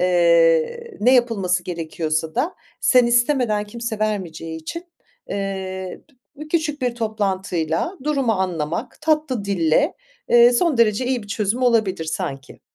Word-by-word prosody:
Eee, 170 Hz, -, +3 dB
ne 250 Hz, +5 st, +5 dB
yapılması 195 Hz, -8 st, +1 dB
gerekiyorsa 160 Hz, -2 st, -3 dB
da 295 Hz, +9 st, -1 dB, 0.3 s
sen 250 Hz, -2 st, +5 dB
istemeden 240 Hz, -3 st, +2 dB
kimse 230 Hz, +1 st, -5 dB
vermeyeceği 175 Hz, -7 st, -3 dB
için, 335 Hz, -, -6 dB, 0.4 s
eee, 190 Hz, -2 st, -4 dB, 0.4 s
bü 305 Hz, +1 st, -9 dB
küçük 305 Hz, -4 st, -1 dB
bir 245 Hz, -1 st, 0 dB
toplantıyla 195 Hz, -, -2 dB
durumu 275 Hz, -6 st, +1 dB
anlamak 185 Hz, -, -3 dB
tatlı 300 Hz, -8 st, 0 dB
dille, 195 Hz, -, +1 dB, 0.3 s
eee, 240 Hz, 0 st, +7 dB
son 305 Hz, +3 st, +2 dB
derece 230 Hz, +2 st, +3 dB
iyi 250 Hz, -3 st, -1 dB
bir 205 Hz, -, -14 dB
çözüm 215 Hz, +4 st, -1 dB
olabilir 220 Hz, -9 st, +2 dB
sanki. 135 Hz, -4 st, -5 dB
210 Hz, 125 wpm, -21 LUFS, 175-250 Hz, 0.4 s, eee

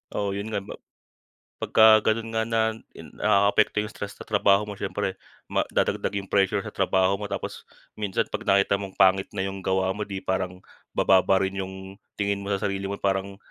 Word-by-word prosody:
Oo, 100 Hz, -1 st, -1 dB
yun 100 Hz, +2 st, -4 dB
nga, 105 Hz, -3 st, -3 dB
ba -, -, -9 dB, 0.8 s
pagka 110 Hz, 0 st, +6 dB
ganun 115 Hz, 0 st, -4 dB
nga 110 Hz, -, +1 dB
na 110 Hz, -1 st, +1 dB, 0.2 s
nakaapekto 100 Hz, 0 st, +2 dB
yung 105 Hz, -, -8 dB
stress 100 Hz, 0 st, -7 dB
sa -, -, -10 dB
trabaho 100 Hz, -1 st, +3 dB
mo 105 Hz, -, -6 dB
siyempre 100 Hz, -, -3 dB, 0.3 s
madadagdag 100 Hz, -, -1 dB
yung 100 Hz, -, -4 dB
pressure 100 Hz, +1 st, +2 dB
sa -, -, -7 dB
trabaho 95 Hz, 0 st, +2 dB
mo. 105 Hz, -, -4 dB
Tapos 100 Hz, -, -6 dB, 0.2 s
minsan 105 Hz, -3 st, -1 dB
'pag -, -, -2 dB
nakita 100 Hz, 0 st, +2 dB
mong 95 Hz, -1 st, -8 dB
pangit 95 Hz, 0 st, +4 dB
na 95 Hz, -2 st, -3 dB
yung 95 Hz, 0 st, -5 dB
gawa 95 Hz, 0 st, 0 dB
mo 105 Hz, -, -6 dB
di 100 Hz, -2 st, -4 dB
parang 90 Hz, -1 st, -2 dB, 0.4 s
bababa 95 Hz, 0 st, +4 dB
rin 95 Hz, 0 st, -3 dB
yung 95 Hz, +1 st, -9 dB, 0.2 s
tingin 100 Hz, -1 st, -1 dB
mo 100 Hz, -, -6 dB
sa 100 Hz, -1 st, -1 dB
sarili 100 Hz, 0 st, -2 dB
mo 100 Hz, -, -3 dB
parang, 95 Hz, 0 st, -1 dB
100 Hz, 185 wpm, -25 LUFS, 95-105 Hz, 0.8 s, pagka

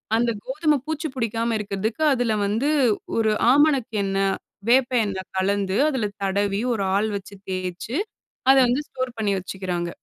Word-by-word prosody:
அந்த 235 Hz, +1 st, +2 dB, 0.2 s
கோதும 300 Hz, +2 st, +1 dB
பூச்சி 315 Hz, 0 st, -3 dB
பிடிக்காம 230 Hz, -1 st, -1 dB
இருக்கிறதுக்கு 210 Hz, +7 st, -2 dB
அதில 240 Hz, -3 st, +1 dB
வந்து 225 Hz, +9 st, 0 dB, 0.5 s
ஒரு 220 Hz, -1 st, +3 dB, 0.2 s
ஆமணக்கு 280 Hz, -5 st, +3 dB
எண்ணெ, 195 Hz, 0 st, 0 dB, 0.4 s
வேப்ப 255 Hz, +1 st, +4 dB
எண்ணெ 190 Hz, -2 st, -3 dB, 0.2 s
கலந்து, 195 Hz, 0 st, 0 dB
அதில 245 Hz, -7 st, -1 dB, 0.2 s
தடவி, 200 Hz, +1 st, 0 dB
ஒரு 200 Hz, -3 st, -1 dB
ஆள் 210 Hz, +2 st, +2 dB
வச்சு 200 Hz, 0 st, -7 dB
தேய்ச்சு, 185 Hz, +6 st, -4 dB, 0.5 s
அத 270 Hz, -, +8 dB
வந்து 255 Hz, +5 st, +1 dB
ஸ்டோர் 255 Hz, -1 st, -4 dB
பண்ணி 210 Hz, -2 st, 0 dB
வச்சுக்கிறாங்க. 180 Hz, -2 st, -4 dB
220 Hz, 145 wpm, -23 LUFS, 195-255 Hz, 0.5 s, அத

